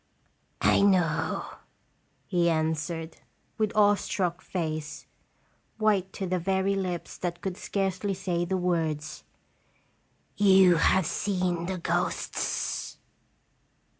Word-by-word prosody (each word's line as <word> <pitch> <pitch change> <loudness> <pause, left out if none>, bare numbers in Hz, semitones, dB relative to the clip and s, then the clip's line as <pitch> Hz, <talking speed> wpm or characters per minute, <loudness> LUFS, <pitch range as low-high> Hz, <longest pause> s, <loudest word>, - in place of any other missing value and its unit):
"I - - +5
know" 185 -5 +2 0.8
he 175 -1 +2
answered, 160 +1 -2 0.4
with 215 -1 +1
awe 205 -1 +6
struck 185 -3 -2
face, 155 -4 -4 0.7
white 205 -4 +1
to 195 - -4
the 185 0 -1
very 190 +2 +1
lips 185 -3 -4
that 175 -1 -3
could 185 0 -4
scarcely 195 0 -2
say 175 -2 -1
the 185 +2 -1
words, 160 -4 -1 1.1
"you 190 -3 +6
have 185 +2 +3
seen 180 -1 -1
the 190 0 -2
ghosts!" 170 - -2
180 Hz, 105 wpm, -27 LUFS, 170-195 Hz, 1.1 s, awe